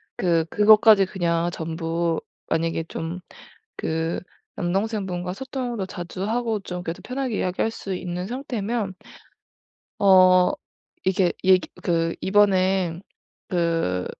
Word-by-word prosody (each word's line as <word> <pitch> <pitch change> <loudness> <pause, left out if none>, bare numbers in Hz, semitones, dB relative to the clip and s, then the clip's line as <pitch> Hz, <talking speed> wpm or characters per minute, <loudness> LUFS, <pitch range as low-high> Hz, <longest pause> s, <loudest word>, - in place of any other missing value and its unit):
그 165 -3 +1
그것까지 210 0 +6
그냥 170 -3 0
전부 165 0 -2 0.3
만약에 165 0 0
좀 165 +3 -5 0.6
그 160 +1 -1 0.4
남동생분과 190 -1 -2
소통도 245 -2 -4
자주 185 0 -6
하고 225 -1 -1
좀 180 -2 -6
그래도 165 -1 -5
편하게 255 -4 -3
이야기할 185 +4 0
수 195 -3 -5
있는 180 0 -4
상태면 235 -4 -3 1.1
어 185 -2 +6 0.5
이게 185 -2 +2
얘기 185 -1 +4
그 165 -1 0
이번에 190 -3 +2 0.5
그 165 - 0
185 Hz, 225 characters per minute, -24 LUFS, 170-205 Hz, 1.1 s, 그것까지